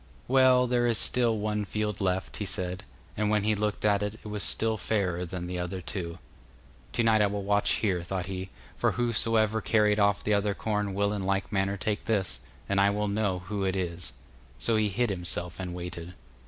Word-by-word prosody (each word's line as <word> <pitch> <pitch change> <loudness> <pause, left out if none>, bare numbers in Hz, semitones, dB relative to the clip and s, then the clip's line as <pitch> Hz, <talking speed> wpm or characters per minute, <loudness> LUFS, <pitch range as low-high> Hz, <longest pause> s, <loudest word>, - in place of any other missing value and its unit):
'Well, 130 -1 +5
there 120 -1 +2
is 115 -2 +3
still 120 -3 +4
one 105 0 -1
field 105 0 -3
left,' 95 -1 -1
he 105 - -3
said, 90 -1 -2 0.3
and 105 0 0
when 105 -1 +2
he 110 +1 +2
looked 105 0 -2
at 100 -1 +3
it, 105 +1 -2
it - - -8
was 105 -1 -3
still 110 +1 +2
fairer 95 -5 -1
than 90 0 -5
the 90 0 -4
other 90 +2 -3
two. 85 -2 -5 0.7
'To 120 - +1
night 110 -1 +4
I 105 - +4
will 100 0 -3
watch 100 +1 +2
here,' 95 -5 0
thought 90 +1 -3
he, 95 0 -5 0.3
'for - - +1
whosoever 115 -2 +2
carried 105 -1 +3
off 100 0 +3
the 105 - +1
other 100 0 +1
corn 105 -3 -2
will 100 +1 +1
in 100 -2 -3
like 95 +1 -1
manner 100 0 0
take 105 +2 -2
this, 105 -5 0 0.3
and 100 0 +2
I 100 - +5
will 105 +1 -1
know 100 -3 -1
who 100 +1 -3
it 95 0 0
is.' 90 -2 -4 0.4
So 115 - +1
he 110 -1 +2
hid 115 +3 0
himself 90 -1 -3
and 90 -2 -4
waited. 90 0 -7
100 Hz, 210 wpm, -28 LUFS, 95-110 Hz, 0.7 s, Well